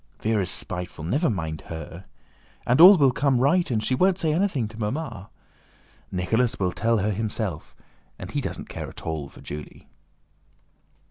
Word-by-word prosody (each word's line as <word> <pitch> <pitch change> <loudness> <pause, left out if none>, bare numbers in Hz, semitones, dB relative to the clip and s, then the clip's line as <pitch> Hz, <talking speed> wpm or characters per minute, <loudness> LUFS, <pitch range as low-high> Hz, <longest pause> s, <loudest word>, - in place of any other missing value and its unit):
"Véra's 105 -5 0
spiteful; 90 -3 -5
never 140 - +1
mind 80 -7 -3
her! 80 +3 -8 0.6
And 125 +6 +4
all 190 +3 +11
will 140 -4 +5
come 135 -1 +1
right 170 +7 +3
and 110 -4 0
she 130 - 0
won't 185 +7 +3
say 160 -5 0
anything 165 - 0
to 110 +1 -12
Mamma. 105 - -4 0.8
Nicholas 110 +7 0
will 90 -2 +1
tell 115 +5 +1
her 105 +1 0
himself, 105 -5 -3 0.4
and - - -8
he - - -1
doesn't - - -5
care - - -6
at - - -11
all 80 -4 -4
for - - -15
Julie." 75 0 -9
110 Hz, 160 wpm, -25 LUFS, 90-140 Hz, 0.8 s, all